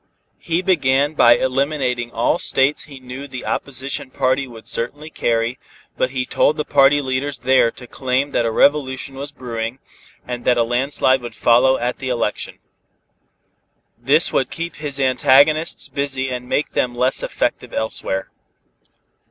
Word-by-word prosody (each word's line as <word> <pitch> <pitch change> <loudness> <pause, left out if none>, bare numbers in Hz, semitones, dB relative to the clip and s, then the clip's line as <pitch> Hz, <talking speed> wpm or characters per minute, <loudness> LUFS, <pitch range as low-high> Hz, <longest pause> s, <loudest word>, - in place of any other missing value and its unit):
He 170 +2 -1
began 145 -5 +2
by 120 -5 +6
eliminating 130 -2 -1
all 120 +9 +1
states 135 +3 +1
he 140 -3 -12
knew 130 +2 -8
the 130 -2 -8
opposition 135 -1 -3
party 130 +1 0
would 115 -3 -12
certainly 145 +7 -4
carry, 115 0 -1 0.4
but 130 - 0
he 130 -1 -2
told 150 +4 +1
the 150 - -2
party 145 +1 +4
leaders 135 +2 -2
there 130 -1 +3
to 125 - -12
claim 130 +3 -1
that - - +1
a 115 - 0
revolution 135 +2 +1
was 140 +2 -6
brewing, 120 -3 -5 0.5
and 120 -1 -5
that 125 0 +3
a 120 - +4
landslide 130 +2 +1
would 120 - -8
follow 125 +3 +4
at 120 +1 -3
the 130 - -4
election. 120 -4 -2 1.4
This - - +2
would - - +1
keep 170 +1 -6
his 145 -2 -4
antagonists 140 +5 +3
busy 135 -2 -3
and 125 0 -5
make 150 - 0
them 120 -1 -1
less 125 +2 +1
effective - - -2
elsewhere. 95 -3 -3
130 Hz, 150 wpm, -20 LUFS, 125-140 Hz, 1.4 s, by